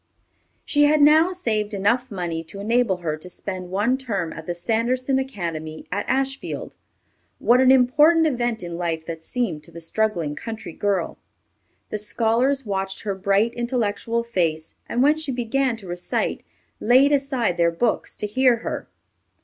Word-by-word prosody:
She 290 Hz, 0 st, +4 dB
had 300 Hz, +1 st, +4 dB
now 310 Hz, +4 st, +6 dB
saved 215 Hz, -, -1 dB
enough 235 Hz, +6 st, +1 dB
money 175 Hz, -5 st, -3 dB
to 195 Hz, +5 st, -9 dB
enable 225 Hz, -2 st, +1 dB
her 155 Hz, -1 st, 0 dB
to 180 Hz, +4 st, -9 dB
spend 185 Hz, 0 st, -6 dB
one 215 Hz, +8 st, +1 dB
term 200 Hz, -10 st, -3 dB
at 160 Hz, -, -9 dB
the 175 Hz, -, -2 dB
Sanderson 245 Hz, +8 st, 0 dB
Academy 165 Hz, -11 st, -5 dB
at 205 Hz, +3 st, -2 dB
Ashfield. 270 Hz, +1 st, -2 dB, 0.6 s
What 245 Hz, +2 st, +4 dB
an 260 Hz, 0 st, +6 dB
important 295 Hz, +6 st, +5 dB
event 240 Hz, -, -1 dB
in 170 Hz, 0 st, -5 dB
life 165 Hz, -2 st, -2 dB
that 165 Hz, -1 st, -6 dB
seemed 225 Hz, -4 st, -2 dB
to 170 Hz, -, -14 dB
the 170 Hz, -, -9 dB
struggling 170 Hz, -3 st, -1 dB
country 220 Hz, -4 st, -7 dB
girl! 195 Hz, -3 st, -1 dB, 0.7 s
The 215 Hz, -, -1 dB
scholars 235 Hz, +6 st, +1 dB
watched 195 Hz, -1 st, -3 dB
her 205 Hz, -, -2 dB
bright, 200 Hz, +4 st, +1 dB
intellectual 235 Hz, -1 st, -1 dB
face, 165 Hz, -8 st, -1 dB, 0.2 s
and 245 Hz, -, +1 dB
when 300 Hz, +2 st, +4 dB
she 315 Hz, -3 st, -3 dB
began 250 Hz, 0 st, 0 dB
to 200 Hz, -4 st, -12 dB
recite, 175 Hz, 0 st, -2 dB, 0.4 s
laid 260 Hz, +5 st, +5 dB
aside 270 Hz, -9 st, +1 dB
their 170 Hz, -1 st, +4 dB
books 215 Hz, +8 st, -1 dB
to -, -, -4 dB
hear 250 Hz, +4 st, +3 dB
her. -, -, -4 dB
220 Hz, 160 wpm, -23 LUFS, 180-255 Hz, 0.7 s, now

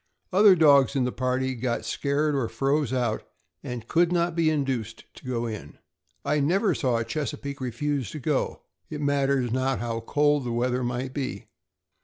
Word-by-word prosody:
Other 200 Hz, 0 st, +7 dB
dogs 145 Hz, -5 st, +5 dB
in 135 Hz, -, +2 dB
the 125 Hz, -, 0 dB
party 130 Hz, +1 st, -1 dB
got 120 Hz, -1 st, -2 dB
scared 145 Hz, +2 st, 0 dB
or 135 Hz, -5 st, 0 dB
froze 135 Hz, +3 st, 0 dB
out, 120 Hz, -4 st, 0 dB, 0.4 s
and 120 Hz, -2 st, -6 dB
could 170 Hz, +1 st, +3 dB
not 170 Hz, -1 st, +1 dB
be 165 Hz, -2 st, +3 dB
induced 130 Hz, -7 st, -2 dB
to -, -, -15 dB
go 120 Hz, -2 st, -1 dB
in. 105 Hz, -11 st, -7 dB, 0.5 s
I 150 Hz, -, +1 dB
never 185 Hz, +7 st, +2 dB
saw 125 Hz, -5 st, 0 dB
a 115 Hz, -, -2 dB
Chesapeake 140 Hz, 0 st, -4 dB
refuse 130 Hz, +1 st, -2 dB
to 155 Hz, -, -6 dB
go, 145 Hz, 0 st, -1 dB, 0.3 s
it 150 Hz, -, -5 dB
matters 140 Hz, -3 st, +1 dB
not 130 Hz, +1 st, 0 dB
how 115 Hz, -1 st, -3 dB
cold 145 Hz, +4 st, +1 dB
the 120 Hz, -, -3 dB
weather 125 Hz, +1 st, 0 dB
might 125 Hz, +2 st, -3 dB
be. 135 Hz, -2 st, -4 dB
135 Hz, 175 wpm, -26 LUFS, 125-150 Hz, 0.5 s, Other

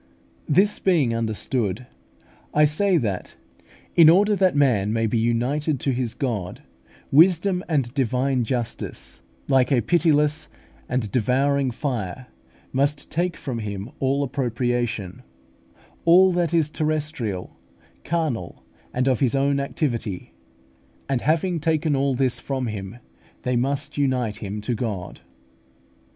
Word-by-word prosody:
This 200 Hz, +7 st, +3 dB
being 155 Hz, -11 st, +2 dB
understood, 115 Hz, 0 st, -2 dB, 0.7 s
I 150 Hz, 0 st, +6 dB
say 180 Hz, +5 st, +2 dB
that, 105 Hz, -, -3 dB, 0.6 s
in 165 Hz, -2 st, +8 dB
order 205 Hz, +5 st, +5 dB
that 190 Hz, -5 st, +2 dB
man 120 Hz, -8 st, +2 dB
may 115 Hz, 0 st, +1 dB
be 110 Hz, +1 st, 0 dB
united 130 Hz, +6 st, 0 dB
to 135 Hz, -, +1 dB
his 125 Hz, -2 st, -2 dB
God, 105 Hz, -9 st, -3 dB, 0.5 s
wisdom 180 Hz, +4 st, +4 dB
and 135 Hz, -7 st, 0 dB
divine 130 Hz, -1 st, +1 dB
justice, 115 Hz, -, -4 dB, 0.3 s
like 135 Hz, 0 st, +3 dB
a 125 Hz, -3 st, +4 dB
pitiless 150 Hz, -, +2 dB, 0.4 s
and 120 Hz, -5 st, -1 dB
devouring 135 Hz, +3 st, +1 dB
fire, 120 Hz, -3 st, -4 dB, 0.5 s
must 140 Hz, +2 st, 0 dB
take 175 Hz, +1 st, -1 dB
from 125 Hz, -4 st, -4 dB
him 105 Hz, +1 st, -5 dB
all 140 Hz, +1 st, +1 dB
appropriation, 120 Hz, -7 st, -2 dB, 0.8 s
all 185 Hz, +3 st, +6 dB
that 175 Hz, -2 st, 0 dB
is 160 Hz, -3 st, +1 dB
terrestrial, 150 Hz, -, -2 dB, 0.5 s
carnal, 150 Hz, -, -2 dB, 0.3 s
and 130 Hz, +1 st, +1 dB
of 130 Hz, -3 st, +2 dB
his 130 Hz, -1 st, +2 dB
own 140 Hz, +1 st, +2 dB
activity; 120 Hz, -, -3 dB, 0.7 s
and 135 Hz, -3 st, 0 dB
having 165 Hz, +3 st, +1 dB
taken 155 Hz, -1 st, +1 dB
all 135 Hz, -1 st, +1 dB
this 130 Hz, -1 st, +1 dB
from 135 Hz, -2 st, -3 dB
him, 105 Hz, -1 st, -6 dB, 0.5 s
they 125 Hz, 0 st, 0 dB
must 140 Hz, +4 st, -1 dB
unite 125 Hz, -6 st, 0 dB
him 105 Hz, -1 st, -5 dB
to 115 Hz, +4 st, -2 dB
God. 105 Hz, -6 st, -4 dB
135 Hz, 125 wpm, -23 LUFS, 115-150 Hz, 0.8 s, in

